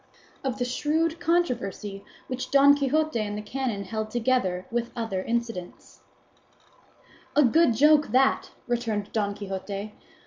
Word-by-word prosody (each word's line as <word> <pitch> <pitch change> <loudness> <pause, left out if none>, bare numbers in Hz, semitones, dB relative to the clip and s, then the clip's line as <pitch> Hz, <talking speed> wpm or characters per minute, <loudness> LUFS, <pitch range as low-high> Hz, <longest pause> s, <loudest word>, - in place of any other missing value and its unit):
OF 265 -1 -2
THE 245 - -1
SHREWD 315 +6 0
CONTROVERSY 240 - -1 0.2
WHICH 255 0 -5
DON 280 +1 +6
QUIXOTE 295 0 +1
AND 210 -1 -2
THE 210 - -5
CANON 235 -3 -3
HELD, 215 +2 -4
TOGETHER 225 -7 0
WITH 240 0 -1
OTHER 225 -6 -2
INCIDENTS 230 -5 -4 1.3
"A 295 - +6
good 285 0 +4
joke, 300 +4 +5
that!" 270 +2 +2 0.2
returned 225 -4 -2
Don 205 -2 -1
Quixote. 200 +1 -5
240 Hz, 130 wpm, -26 LUFS, 205-275 Hz, 1.3 s, DON